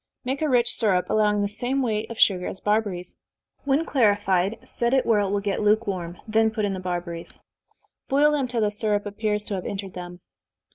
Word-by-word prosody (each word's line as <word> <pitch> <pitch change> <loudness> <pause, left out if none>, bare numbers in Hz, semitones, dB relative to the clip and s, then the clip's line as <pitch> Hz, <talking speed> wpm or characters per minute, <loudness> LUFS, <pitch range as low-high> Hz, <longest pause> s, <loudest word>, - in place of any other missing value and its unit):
Make 265 +3 -2
a 310 - +1
rich 245 -2 +3
syrup, 195 -6 +1
allowing 210 -1 +2
the - - +1
same 245 +6 -1
weight 215 -3 -1
of 230 - -7
sugar 180 -3 +4
as 190 - -6
barberries. 205 -4 -1 0.5
When 280 +4 +2
clarified, 205 - +2
set 235 +2 0
it 265 - +2
where 225 -3 +3
it 200 -1 0
will 200 0 0
get 200 0 -1
lukewarm, 200 -5 0
then 220 0 +3
put 215 -1 -2
in 200 - -1
the 190 - -4
barberries. 175 -2 -5 0.7
Boil 290 +2 +4
them 285 -3 0
till 245 -2 -2
the 210 -1 +2
syrup 210 -1 0
appears 210 0 -2
to - - -4
have 185 -2 -3
entered 195 -2 -5
them. 175 0 -8
210 Hz, 200 wpm, -24 LUFS, 195-230 Hz, 0.7 s, sugar